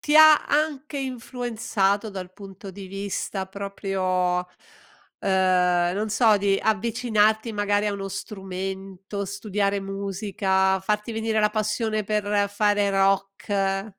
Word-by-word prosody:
ti 295 0 +2
ha 310 -1 +8
anche 295 -1 -1
influenzato 230 -5 -1
dal 185 -2 -7
punto 195 0 -10
di 195 0 -9
vista 195 0 -4
proprio, 190 -2 -1
uhm, 180 - -10 0.7
non 185 +1 +2
so, 220 0 +4
di 195 0 +2
avvicinarti 220 0 +1
magari 205 0 +1
a 205 - 0
uno 195 -1 -4
strumento, 195 0 -5
studiare 200 0 -1
musica, 195 -1 0
farti 210 +3 -1
venire 220 0 -1
la 210 0 +3
passione 215 0 -1
per 205 -1 0
fare 205 0 +2
rock? 195 +1 0
200 Hz, 115 wpm, -24 LUFS, 195-215 Hz, 0.7 s, ha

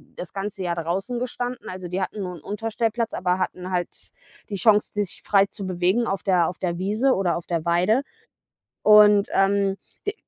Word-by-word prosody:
das 175 - -8
ganze 195 -1 -4
Jahr 170 -1 -1
draußen 190 +9 -2
gestanden. 245 0 -4
Also, 185 -1 -6
die 185 +2 -3
hatten 200 +2 -3
nur 180 -1 -5
'n 160 - -12
Unterstellplatz, 225 +3 -2
aber 180 +1 0
hatten 185 0 -3
halt 180 -1 -1 0.6
die 200 - -3
Chance, 210 +2 +3
sich 205 -3 -3
frei 200 -1 +4
zu 200 -1 -8
bewegen 185 +6 +1
auf 195 -1 -2
der 180 -4 +3
auf 180 - -8
der 175 -1 -3
Wiese 220 +8 +2
oder 185 -3 0
auf 170 - -8
der 170 -2 -2
Weide. 180 +9 +2 0.8
Und, 210 -1 +7
ähm, 195 0 +2 0.3
de 410 - 0
195 Hz, 185 wpm, -24 LUFS, 180-210 Hz, 0.8 s, Und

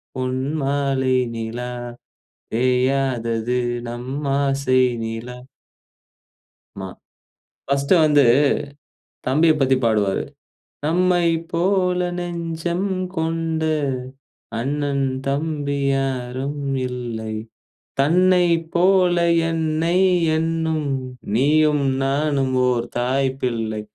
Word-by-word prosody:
பொன்மாலை 135 0 0 0.2
நிலா, 115 +2 -4 0.8
பேயாதது 125 -1 +1 0.3
நம் 120 +2 -6 0.3
ஆசை 135 -2 +2 0.2
நிலா!" 115 +2 -6 1.4
மா. 95 - -5 0.8
ஃபர்ஸ்டு 140 +4 +2
வந்து 145 -1 +5 1.1
தம்பியப் 155 +3 +3
பத்தி 130 0 +4
பாடுவாரு. 105 -4 +1 0.6
"நம்மை 175 +1 +2 0.3
போல 180 +1 +1 0.2
நெஞ்சம் 170 +1 -3 0.3
கொண்ட, 160 0 -1 1.0
அண்ணன், 140 +2 -1 0.2
தம்பி 145 -1 -1
யாரும் 135 +1 -2 0.3
இல்லை. 115 -3 -5 0.7
தன்னை 180 +4 +4 0.3
போல 180 0 +4 0.3
என்னை 160 +1 0 0.4
எண்ணும், 160 -2 -1 0.5
நீயும் 150 +2 +3 0.2
நானும் 135 -1 0
ஓர் 120 -1 +1
தாய் 130 +2 +1
பிள்ளை!" 110 -3 -2
140 Hz, 75 wpm, -21 LUFS, 125-160 Hz, 1.4 s, வந்து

